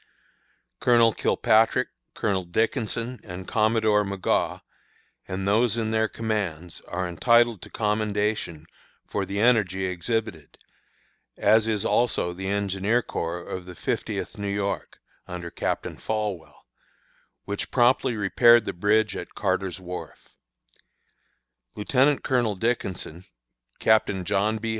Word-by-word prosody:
"Colonel 115 -2 +4
Kilpatrick, 115 +3 +2 0.3
Colonel 100 -4 0
Dickinson, 115 - -1
and 95 -1 -8
Commodore 110 -1 +2
Magaw, 100 -2 -1 0.7
and 95 +1 -3
those 110 +2 +3
in 110 -1 -1
their 110 0 +2
commands, 100 -8 -3
are 90 +1 -2
entitled 115 +4 +3
to - - -10
commendation 105 -6 -1 0.4
for 100 - -2
the 100 +1 -3
energy 105 -5 +3
exhibited, 90 - -3 0.8
as 110 0 +4
is 105 -3 0
also 120 -7 +1
the 95 +2 -6
engineer 100 +3 0
corps 85 +1 -4
of 90 -1 -6
the 90 - -9
Fiftieth 85 - -3
New 100 0 -2
York, 100 0 -3 0.3
under 90 -1 -6
Captain - - -3
Folwell, 100 -8 -4 0.8
which 100 0 -4
promptly 125 0 +3
repaired 115 +4 +5
the - - -3
bridge 105 +5 +2
at - - -7
Carter's 95 -2 -1
wharf. 90 0 -8 1.5
Lieutenant 135 +7 +2
Colonel 120 -5 +1
Dickinson, 95 -5 -3 0.5
Captain 100 -4 +2
John 105 +3 +1
B. 110 +1 -4
105 Hz, 115 wpm, -25 LUFS, 95-115 Hz, 1.5 s, repaired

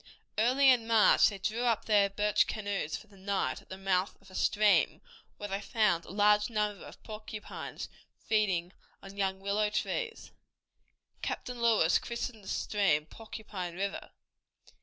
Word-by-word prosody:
Early 260 +4 +5
in 235 -3 +2
May 225 -2 +6
they 200 - -7
drew 220 +4 -2
up 235 -3 +1
their 205 -2 +4
birch 210 +1 +2
canoes 200 -7 -3
for - - -14
the 200 -2 -19
night 195 0 -1
at - - -25
the 190 - -7
mouth 190 0 0
of 195 -1 -18
a - - -15
stream 210 +2 +3 0.4
where 205 - -6
they 195 +1 -2
found 200 -5 +1
a - - -13
large 210 +2 +3
number 210 -2 -1
of - - -13
porcupines 215 -1 -7 0.3
feeding 195 -5 0 0.3
on 195 0 -10
young 190 -1 -1
willow 205 +2 0
trees. 455 - -3 0.9
Captain 250 -1 -4
Lewis 220 -8 +4
christened 235 -2 -5
the - - -13
stream 195 -8 +1
Porcupine 200 -2 -7
River. 200 +2 -4
210 Hz, 155 wpm, -31 LUFS, 195-220 Hz, 0.9 s, May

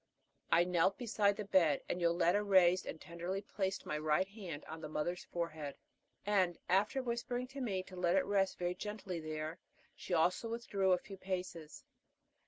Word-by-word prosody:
I 170 - +6
knelt 180 +1 +2
beside 210 -4 +2
the 210 0 -5
bed, 170 -8 +3
and 180 - -2
Yoletta 170 +3 +3
raised 185 -2 +5
and 160 - -5
tenderly 175 +5 -4
placed 190 -1 -2
my 150 - -2
right 155 +4 +2
hand 190 -8 -7
on 160 0 -8
the 155 - -6
mother's 175 +4 -2
forehead, 155 -4 -4 0.5
and, 190 -4 +2
after 210 +9 +2
whispering 245 +1 -2
to 275 +1 -6
me 195 -7 -1
to 185 - -12
let 180 0 +2
it 190 - +3
rest 195 -2 +1
very 175 0 -1
gently 205 -2 -5
there, 155 +1 -4 0.4
she 180 - -2
also 180 +7 +2
withdrew 205 -5 0
a 180 - +6
few 195 +2 -10
paces. 180 -5 -5
185 Hz, 175 wpm, -35 LUFS, 170-200 Hz, 0.5 s, I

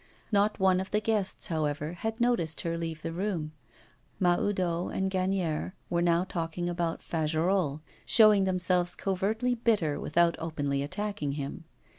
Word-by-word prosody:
Not 205 +1 +2
one 190 -1 +4
of 190 - -6
the 210 - +1
guests, 215 -2 -1
however, 150 -1 -1
had 220 +6 -4
noticed 235 -10 +1
her 170 0 -2
leave 165 -1 -4
the 165 - -3
room. 170 -3 -2 0.7
Mahoudeau 180 -1 +1
and 190 0 -1
Gagnière 185 -3 -1 0.2
were 170 0 +2
now 170 0 +3
talking 175 -1 -3
about 170 -1 -2
Fagerolles; 160 -1 0 0.2
showing 210 -3 +6
themselves 180 -1 +1
covertly 215 +6 0
bitter, 215 -11 +1
without 170 +2 +2
openly 145 -4 -2
attacking 175 -1 -3
him. 145 +3 -5
175 Hz, 140 wpm, -29 LUFS, 160-195 Hz, 0.7 s, showing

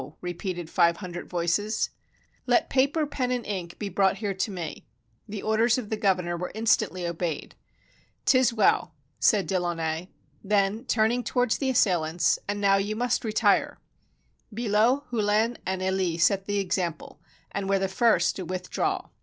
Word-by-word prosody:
repeated 175 -1 -4
five 170 0 +3
hundred 175 -2 -7
voices. 180 +5 0 0.6
"Let - - +2
paper, 280 +4 +2
pen, 265 -3 -2
and 245 -2 -2
ink 180 -4 -5
be 210 - -4
brought 195 +1 +2
here 205 -1 -2
to 195 +3 -2
me." 175 -5 -6 0.4
The 205 -1 -5
orders 225 +2 +3
of 225 -4 -5
the - - +1
governor 185 -4 0
were 180 +1 -4
instantly 215 -5 +1
obeyed. 170 -2 -3 0.4
" - - -36
'T - - +4
is 255 - +3
well," 205 -7 +2 0.2
said 205 -3 +3
De 190 -2 0
Launay. 165 -1 -2 0.4
Then, 205 +3 +1
turning 235 +1 +1
towards 245 -2 0
the 270 - 0
assailants, 175 -9 +2
"And 205 0 -2
now 195 -1 +4
you 205 +2 -1
must 245 +2 0
retire." 215 -2 +2 0.7
Billot, 230 +5 +2
Hullin, 220 +1 +1
and 190 0 -2
EUe 185 -3 0
set 195 +2 +3
the 205 0 0
example, 180 -4 -2 0.3
and 195 -1 -3
were 195 - +3
the 195 0 0
first 225 +5 +2
to - - -4
withdraw. 185 +1 -2
200 Hz, 160 wpm, -26 LUFS, 180-220 Hz, 0.7 s, T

